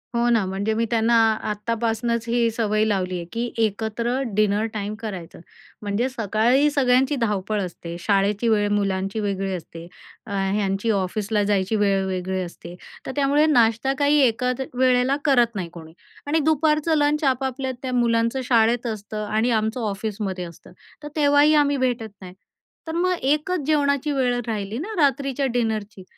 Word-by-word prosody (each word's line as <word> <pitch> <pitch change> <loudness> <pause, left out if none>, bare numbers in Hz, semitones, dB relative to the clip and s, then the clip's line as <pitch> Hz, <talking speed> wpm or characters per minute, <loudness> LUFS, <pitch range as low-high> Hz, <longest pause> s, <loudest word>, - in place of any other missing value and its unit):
हो 235 0 +2
ना, 230 -4 +2
म्हणजे 195 +3 -2
मी 230 +1 0
त्यांना 230 0 +2 0.4
आत्तापासनंच 230 +2 -2
ही 235 -1 +2
सवय 215 -2 0
लावली 185 -3 -1
आहे 170 - -6
की 235 +1 -1 0.2
एकत्र 220 +3 -2 0.2
डिनर 210 0 +2
टाईम 210 0 -4
करायचं. 190 -7 -7 0.4
म्हणजे 210 +5 -1
सकाळी 240 +4 +2
सगळ्यांची 265 0 +2
धावपळ 210 -1 -1
असते, 170 -2 -6
शाळेची 200 +3 +1
वेळ 205 -1 +2
मुलांची 195 0 -1
वेगळी 195 -2 -2
असते, 165 -1 -8 0.4
ह्यांची 195 +1 -1
ऑफिसला 205 +3 -1
जायची 200 0 0
वेळ 195 -2 +2
वेगळी 185 0 -2
असते, 175 0 -8 0.3
तर - - -4
त्यामुळे 285 +1 +3
नाश्ता 240 -2 +3
काही 290 +1 +4
एकाच 250 +3 -1
वेळेला 255 +1 +3
करत 240 -6 +3
नाही 180 -3 -4
कोणी. 160 -1 -11 0.3
आणि 315 +3 +2
दुपारचं 310 +1 +2
लंच 295 +1 +1
आपापल्या 265 0 0
त्या 255 -1 -4
मुलांचं 235 +1 +1
शाळेत 235 0 +2
असतं 215 -1 -5
आणि 220 +3 0
आमचं 220 +3 -2
ऑफिसमध्ये 195 -2 -4
असतं, 170 -2 -13 0.3
तर - - -5
तेव्हाही 290 0 +4
आम्ही 285 0 0
भेटत 245 -4 -1
नाही. 180 -1 -10 0.5
तर - - -3
मग 365 +2 +1
एकच 305 +6 0
जेवणाची 290 -1 +1
वेळ 250 -3 +1
राहिली 210 -1 -3
ना, 395 - -5
रात्रीच्या 275 -1 +1
डिनरची. 215 -4 -2
225 Hz, 150 wpm, -23 LUFS, 200-265 Hz, 0.5 s, काही